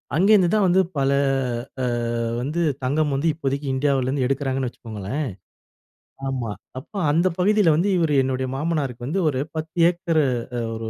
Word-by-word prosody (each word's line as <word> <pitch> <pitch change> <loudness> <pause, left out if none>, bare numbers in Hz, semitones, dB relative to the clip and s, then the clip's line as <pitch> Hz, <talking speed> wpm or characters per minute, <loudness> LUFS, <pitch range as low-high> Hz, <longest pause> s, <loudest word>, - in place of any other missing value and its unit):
அங்கே 195 +6 +4
இருந்துதான் 200 +1 +4
வந்து 185 +2 +4 0.2
பல 135 0 +2 0.7
அ - - -1 0.6
வந்து 150 +7 -2 0.2
தங்கம் 145 +3 +1
வந்து, 150 +5 0
இப்போதைக்கி 140 -2 -3
இந்தியாவுல 135 -1 +1
இருந்து 130 -1 0
எடுக்கிறாங்கன்னு 135 -1 -1
வச்சுக்கோங்களேன். 115 +5 -5 1.0
ஆமா. 125 -5 -2 0.3
அப்ப 130 - -17 0.2
அந்த 170 +5 +3
பகுதியில 200 -3 +4
வந்து, 180 +6 +1
இவரு 160 -4 +2
என்னுடைய 130 0 -1
மாமனாருக்கு 135 -5 -2
வந்து, 185 +7 0
ஒரு 130 -2 -1
10 155 0 -5
ஏக்கரு 170 -3 +1 0.3
அ - - -1
ஒரு 110 0 -5
145 Hz, 150 wpm, -23 LUFS, 130-170 Hz, 1.0 s, அங்கே